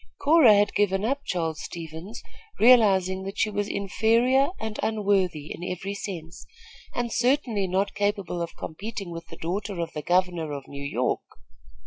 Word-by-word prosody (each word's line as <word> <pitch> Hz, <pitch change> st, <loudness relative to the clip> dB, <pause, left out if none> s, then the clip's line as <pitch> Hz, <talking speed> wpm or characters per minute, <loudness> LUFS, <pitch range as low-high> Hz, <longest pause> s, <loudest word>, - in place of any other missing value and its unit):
Cora 285 Hz, -8 st, +6 dB
had 205 Hz, 0 st, +3 dB
given 200 Hz, 0 st, +1 dB
up 280 Hz, +4 st, -1 dB
Charles 165 Hz, -3 st, -2 dB
Stevens, 170 Hz, +7 st, -8 dB, 0.4 s
realizing 195 Hz, -6 st, +5 dB
that 195 Hz, +2 st, -6 dB
she 215 Hz, -, +1 dB
was 205 Hz, 0 st, -1 dB
inferior 230 Hz, +7 st, +2 dB
and 220 Hz, -1 st, -5 dB
unworthy 195 Hz, -8 st, 0 dB
in 175 Hz, -, -9 dB
every 185 Hz, +2 st, -4 dB
sense, 175 Hz, -5 st, -7 dB, 0.5 s
and 240 Hz, -1 st, -2 dB
certainly 245 Hz, -5 st, +1 dB
not 190 Hz, +2 st, 0 dB
capable 205 Hz, -4 st, -1 dB
of 170 Hz, -, -5 dB
competing 195 Hz, +2 st, -6 dB
with 165 Hz, 0 st, -7 dB
the -, -, -11 dB
daughter 190 Hz, +3 st, -3 dB
of 170 Hz, -, -3 dB
the 150 Hz, -, -4 dB
governor 175 Hz, -2 st, +1 dB
of 140 Hz, -1 st, -7 dB
New 140 Hz, 0 st, -7 dB
York. 125 Hz, -3 st, -1 dB
195 Hz, 155 wpm, -26 LUFS, 170-220 Hz, 0.5 s, Cora